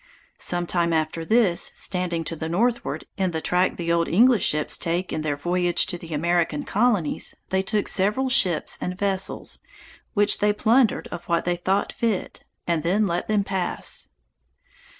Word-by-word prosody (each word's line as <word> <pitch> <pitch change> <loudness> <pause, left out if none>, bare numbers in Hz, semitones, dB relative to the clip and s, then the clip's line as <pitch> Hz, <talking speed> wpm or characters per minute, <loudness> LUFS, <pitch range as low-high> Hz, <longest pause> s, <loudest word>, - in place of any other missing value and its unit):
Sometime 175 -1 0
after 160 +1 -1
this, 210 -2 +2
standing 180 -3 +1
to 165 - -5
the 160 +1 -5
northward, 235 +7 -1
in 190 -1 0
the 160 -2 -3
track 180 +3 0
the 170 -1 -2
old 170 0 +1
English 230 +2 +4
ships 150 0 +1
take 175 +2 -2
in 155 - -2
their 150 -2 -1
voyage 175 +3 +1
to - - -4
the 165 -1 -11
American 165 -1 0
colonies, 210 -7 0
they 190 0 +1
took 205 +2 -1
several 210 +8 +2
ships 185 -11 +1
and 180 0 -4
vessels, 195 -1 -2 0.6
which 205 0 +3
they 210 0 +2
plundered 225 +3 +2
of 170 - -7
what 170 -1 0
they 175 0 +1
thought 190 +3 -1
fit, 225 -5 -3 0.2
and 170 -2 0
then 195 +6 +1
let 175 -2 -2
them 210 -2 +1
pass. 190 -2 -2
180 Hz, 165 wpm, -23 LUFS, 170-205 Hz, 0.6 s, English